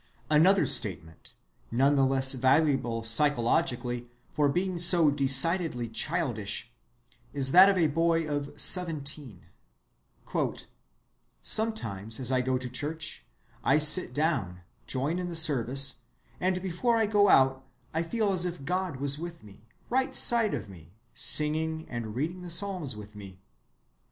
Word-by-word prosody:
Another 180 +6 +4
statement 80 -5 0 0.3
(none 135 +5 +2
the 135 -1 +2
less 135 0 +4
valuable 130 -3 +1
psychologically 120 -1 +1 0.3
for 145 -1 +1
being 180 +3 -2
so 170 -3 +6
decidedly 140 -1 +1
childish) 120 - -3 0.6
is 135 -2 0
that 185 +4 +7
of 195 - +1
a 170 - +2
boy 165 +1 0
of 145 -1 -5
seventeen:— 150 - +1 2.0
"Sometimes 115 - -2
as 130 -1 -1
I 130 -1 +1
go 130 0 -1
to 125 0 -6
church, 150 +6 -5 0.4
I 135 - +3
sit 155 +4 +3
down, 120 - -2 0.3
join 145 +7 -2
in 180 -1 -4
the 170 - -6
service, 135 -4 +1 0.4
and 185 0 -2
before 195 +6 -1
I 225 - +2
go 205 -1 +2
out 130 0 +3 0.3
I 160 - -1
feel 200 +4 -1
as 180 -2 +1
if 175 -6 -5
God 180 -1 -2
was 140 +2 -2
with 170 -3 -8
me, 105 +1 -17 0.2
right 260 +1 -1
side 230 -3 +3
of - - -7
me, 85 -3 -15 0.2
singing 160 +1 0
and 115 -3 -6
reading 165 +8 -4
the 180 - -9
Psalms 175 - -2
with 105 0 -12
me.... 95 -3 -12
145 Hz, 140 wpm, -27 LUFS, 125-175 Hz, 2.0 s, that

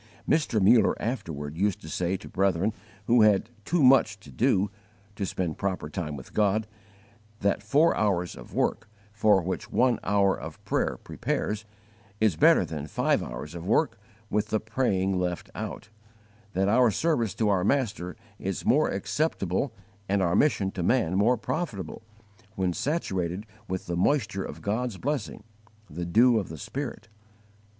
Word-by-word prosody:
Mr. 150 -8 +2
Muller 110 +4 +5
afterward 80 - -4
used 100 +2 0
to - - -10
say 90 +3 -1
to 100 - -12
brethren 95 +2 +1 0.3
who 120 +1 +5
had 105 +1 +4
"too 170 -3 +2
much 125 -5 +5
to 75 - -13
do" 95 +9 +2 0.4
to 100 -1 -2
spend 85 -4 -3
proper 95 -6 -2
time 75 -4 -4
with 65 - -12
God, 105 +1 +2 0.8
that 100 0 +1
four 145 +10 +3
hours 90 -5 0
of - - -12
work - - -1 0.2
for 105 -3 +4
which 95 +2 -4
one 125 -2 +3
hour 100 -1 +3
of - - -8
prayer - - 0
prepares, 105 +1 -3 0.5
is 110 -6 +3
better - - +5
than 75 -2 -5
five - - +1
hours - - -6
of 85 +1 -7
work 130 +2 +2 0.3
with 105 0 0
the 110 0 0
praying 100 -5 0
left 90 -1 -3
out; - - -6 0.6
that 95 +2 +1
our 120 +3 +5
service 120 - 0
to 110 -2 +1
our 95 -3 +2
Master 100 -7 0 0.2
is - - -3
more - - +4
acceptable 135 - -1 0.4
and 100 -1 +2
our 85 -1 +2
mission 100 -10 +2
to 95 - -4
man 95 -1 +2
more 115 +6 +3
profitable, 110 - -4 0.5
when 95 -2 0
saturated 95 - -2 0.2
with 95 0 -3
the 85 - -3
moisture 105 -1 +1
of - - -8
God's 110 +1 -1
blessing 140 -5 -3 0.4
the 85 +4 -5
dew 115 +6 +5
of 100 - -5
the 80 - -7
Spirit. 120 - -5
100 Hz, 160 wpm, -27 LUFS, 90-115 Hz, 0.8 s, Muller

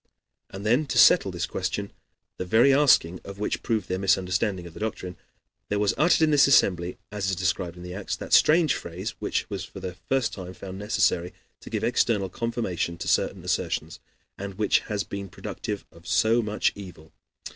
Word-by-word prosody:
And 95 +2 -8
then 125 +7 +2
to - - -2
settle - - +6
this - - -3
question, - - -3 0.5
the - - -3
very 115 +9 +4
asking 125 - +4
of 100 0 -9
which 105 - -2
proved 110 -3 -1
their 95 - -2
misunderstanding 95 0 0
of 85 - -10
the - - -10
doctrine, 95 -4 -4 0.5
there 105 - 0
was 105 -1 +2
uttered 165 0 +3
in 155 - +4
this 145 -2 +6
assembly, 90 -9 +3
as 100 -2 -2
is 95 - 0
described 90 -1 -2
in 90 - -10
the 90 0 -7
Acts, 100 +1 -4
that - - -6
strange 160 0 +5
phrase, 90 +7 -5
which - - -2
was - - -3
for - - -10
the 90 -1 -5 0.2
first 135 -2 +1
time 95 -1 -8
found 95 0 -8
necessary 95 -4 0 0.2
to - - -11
give - - -3
external 100 -5 +1
confirmation 95 -6 -3
to - - -6
certain - - +1
assertions, 80 +1 -2 0.4
and 100 -1 -6
which 105 0 +2
has 105 -2 -3
been 100 -1 -6
productive 105 +3 -6
of 85 0 -16
so 115 +5 +3
much 105 -1 0
evil. 90 -5 -11
100 Hz, 190 wpm, -26 LUFS, 90-110 Hz, 0.5 s, settle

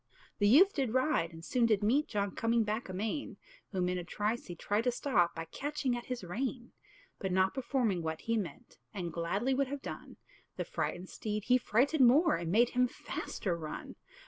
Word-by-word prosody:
The 205 - +4
youth 355 - +7
did 260 -4 -1
ride, 255 - +2
and 165 0 -11
soon 240 +2 +2
did 215 -2 +2
meet 270 +8 +3
John 200 -2 -1
coming 230 +2 +1
back 215 +1 -3
amain; 215 +9 -3 0.3
Whom 185 -3 0
in 180 0 -1
a - - -5
trice 210 +6 -2
he 175 - -6
tried 205 +6 -1
to 250 - +3
stop, 215 -9 +1
By 165 0 -4
catching 275 - -2
at 240 - -6
his 250 -4 -4
rein; 240 +7 -4 0.5
But 190 - -2
not 190 +1 +3
performing 245 -8 0
what 160 -1 -3
he 230 - 0
meant, 225 +3 -5 0.2
And 175 -4 -4
gladly 200 +10 0
would 275 +1 +1
have 280 +1 -5
done, - - -8 0.4
The - - -2
frightened 185 - -3
steed 210 -1 -3
he 250 +2 +4
frighted 265 +7 +2
more, 285 +7 +6
And 165 0 -3
made 235 +5 +5
him 250 0 +2
faster 190 -6 -4
run. 155 -2 -7
220 Hz, 200 wpm, -32 LUFS, 185-255 Hz, 0.5 s, youth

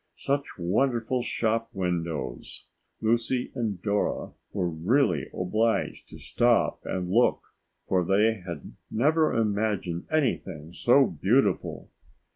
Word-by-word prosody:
Such 140 +1 -2
wonderful 120 +7 0
shop 115 -1 -1
windows! 85 -9 -3 0.4
Lucy 120 +3 0
and 110 -6 -2
Dora 105 -1 -1 0.2
were 95 -3 -1
really 85 - +1
obliged 110 +5 -1
to - - -10
stop 120 -1 +1
and 90 -1 -2
look, 120 +5 +3 0.4
for 90 -1 +1
they 105 +3 +2
had 85 -2 -7 0.2
never 155 +7 +2
imagined 105 -5 -1
anything 95 - -1
so 135 +7 +5
beautiful. 100 - 0
110 Hz, 105 wpm, -27 LUFS, 90-120 Hz, 0.4 s, so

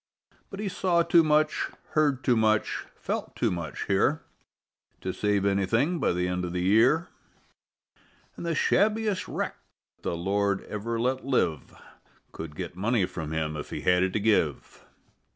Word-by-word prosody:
But 195 - -8
he 210 - -2
saw 180 -2 +1
too 170 0 +5
much, 155 0 +2 0.2
heard 145 -4 +1
too 125 0 +3
much, 110 -1 +1
felt - - -4
too - - +1
much 85 -4 -4
here - - +1 0.8
To 95 - -3
save 105 -1 0
anything 115 - +1
by - - +2
the 90 +1 0
end 90 0 -2
of 90 -1 -4
the 90 0 -1
year, 120 - +4 1.3
An' - - -9
the 170 -1 -1
shabbiest 210 +2 +1
wreck - - -3 0.4
the 85 - -2
Lord 100 +2 0
ever 115 +2 -4
let 130 +2 0
live 90 - -1 0.6
Could 80 -2 -8
get 85 +1 -6
money 105 +1 +1
from 80 -4 -6
him 80 -1 -2
if 75 - -6
he - - -5
had 90 0 +3
it 95 0 +1
to - - +1
give. 100 -9 0
105 Hz, 160 wpm, -27 LUFS, 90-150 Hz, 1.3 s, too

